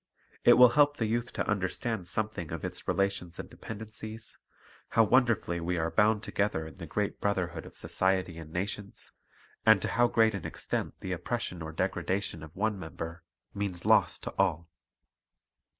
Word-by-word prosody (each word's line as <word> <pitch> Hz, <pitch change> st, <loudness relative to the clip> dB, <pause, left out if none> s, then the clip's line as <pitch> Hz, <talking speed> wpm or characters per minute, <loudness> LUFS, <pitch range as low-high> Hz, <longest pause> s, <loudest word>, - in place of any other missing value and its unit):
It 120 Hz, -, +8 dB
will 125 Hz, 0 st, +9 dB
help 145 Hz, +2 st, +4 dB
the 115 Hz, -, 0 dB
youth 120 Hz, +2 st, -1 dB
to -, -, -2 dB
understand 100 Hz, 0 st, -1 dB
something 105 Hz, -5 st, -1 dB
of 85 Hz, -2 st, -4 dB
its -, -, -5 dB
relations 100 Hz, -3 st, 0 dB
and -, -, -6 dB
dependencies, 110 Hz, +1 st, -8 dB, 0.5 s
how 115 Hz, -, +5 dB
wonderfully 115 Hz, -7 st, +3 dB
we 85 Hz, +1 st, -1 dB
are 80 Hz, 0 st, 0 dB
bound 110 Hz, 0 st, +3 dB
together 100 Hz, -6 st, 0 dB
in 80 Hz, -, -10 dB
the 85 Hz, -3 st, -7 dB
great 105 Hz, +6 st, -2 dB
brotherhood 90 Hz, -5 st, -1 dB
of -, -, -11 dB
society 95 Hz, -3 st, 0 dB
and 80 Hz, -1 st, -10 dB
nations, 100 Hz, +3 st, -3 dB, 0.5 s
and -, -, +7 dB
to -, -, 0 dB
how 120 Hz, +5 st, +4 dB
great 110 Hz, -2 st, +4 dB
an 100 Hz, -, -4 dB
extent -, -, -3 dB
the 95 Hz, -, -4 dB
oppression 90 Hz, -1 st, -3 dB
or 80 Hz, 0 st, -5 dB
degradation 95 Hz, +2 st, -1 dB
of 80 Hz, 0 st, -11 dB
one 105 Hz, 0 st, 0 dB
member 80 Hz, 0 st, -6 dB, 0.3 s
means 100 Hz, -4 st, -3 dB
loss -, -, +4 dB
to -, -, -7 dB
all. 85 Hz, -4 st, +2 dB
100 Hz, 165 wpm, -30 LUFS, 85-110 Hz, 0.5 s, will